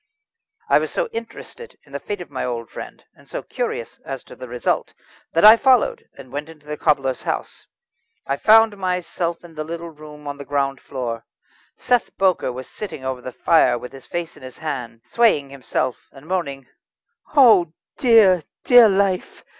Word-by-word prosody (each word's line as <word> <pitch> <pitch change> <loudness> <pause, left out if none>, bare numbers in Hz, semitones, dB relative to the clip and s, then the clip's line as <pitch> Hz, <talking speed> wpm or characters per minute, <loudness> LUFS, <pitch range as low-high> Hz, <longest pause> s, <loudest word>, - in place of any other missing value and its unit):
I - - +5
was - - -3
so - - -1
interested 460 +1 -9
in 140 - -21
the 140 - -4
fate 205 +3 -5
of 175 - -10
my 130 - -3
old 120 -2 -4
friend, - - -9
and - - -21
so - - -5
curious 475 -1 -4
as - - -6
to - - -13
the - - -9
result, - - -2 0.4
that - - +4
I 215 +1 +11
followed, 275 - +2
and 130 -2 -12
went 145 +3 -5
into 150 -2 -15
the 150 0 -4
cobbler's 135 -5 +1
house. - - -4 0.6
I 140 - -1
found 220 +2 +5
myself 180 -2 -2
in 170 -1 -13
the 155 -1 -4
little 170 +1 -6
room 150 -1 -13
on 145 0 -5
the - - -6
ground 140 -1 -1
floor. 120 -4 -5 0.5
Seth 245 -2 0
Bowker 185 -8 +2
was 125 +1 -8
sitting 185 -11 -7
over 130 -1 -3
the 130 - -7
fire 160 -1 +3
with 125 - -9
his 135 -1 -13
face 170 -1 -4
in - - -16
his 130 -1 -10
hands, 120 -7 -5
swaying 180 -13 +2
himself, 130 -2 -3
and 135 +1 -15
moaning: 155 -7 -3 0.7
"Oh 215 - +6 0.3
dear! 220 -8 +5 0.2
dear 245 -3 +8
life! 195 -2 0
160 Hz, 180 wpm, -21 LUFS, 135-210 Hz, 0.7 s, I